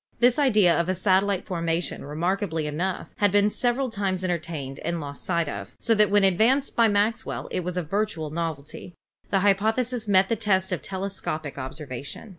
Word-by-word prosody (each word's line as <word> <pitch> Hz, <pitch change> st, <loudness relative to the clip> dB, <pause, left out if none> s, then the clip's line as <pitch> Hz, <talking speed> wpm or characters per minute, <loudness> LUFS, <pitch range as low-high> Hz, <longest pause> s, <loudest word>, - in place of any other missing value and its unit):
This 245 Hz, +3 st, +4 dB
idea 210 Hz, -11 st, +4 dB
of 170 Hz, +1 st, 0 dB
a 185 Hz, -, +1 dB
satellite 190 Hz, +1 st, +2 dB
formation, 170 Hz, -2 st, -2 dB
remarkably 165 Hz, +2 st, -1 dB
enough, 170 Hz, +5 st, -3 dB
had 205 Hz, -2 st, +3 dB
been 205 Hz, +1 st, +3 dB
several 250 Hz, +2 st, 0 dB
times 195 Hz, -3 st, -1 dB
entertained 160 Hz, -6 st, -3 dB
and 170 Hz, 0 st, -2 dB
lost 140 Hz, -2 st, -7 dB
sight 170 Hz, -3 st, 0 dB
of, 100 Hz, -7 st, -7 dB
so 230 Hz, -, +2 dB
that 210 Hz, -2 st, +4 dB
when 205 Hz, 0 st, +4 dB
advanced 225 Hz, +9 st, +3 dB
by 230 Hz, -1 st, +5 dB
Maxwell 210 Hz, +2 st, 0 dB
it 180 Hz, -, -2 dB
was 180 Hz, +1 st, -3 dB
a 180 Hz, -, 0 dB
virtual 165 Hz, -3 st, -2 dB
novelty. 165 Hz, +1 st, -5 dB, 0.3 s
The 195 Hz, -, +2 dB
hy 200 Hz, 0 st, +6 dB
pothesis 225 Hz, +3 st, -1 dB
met 190 Hz, -1 st, +4 dB
the 230 Hz, -, +1 dB
test 190 Hz, -3 st, +1 dB
of 175 Hz, -6 st, -2 dB
telescopic 190 Hz, -7 st, -4 dB
observation. 135 Hz, -, -7 dB
190 Hz, 180 wpm, -25 LUFS, 165-210 Hz, 0.3 s, hy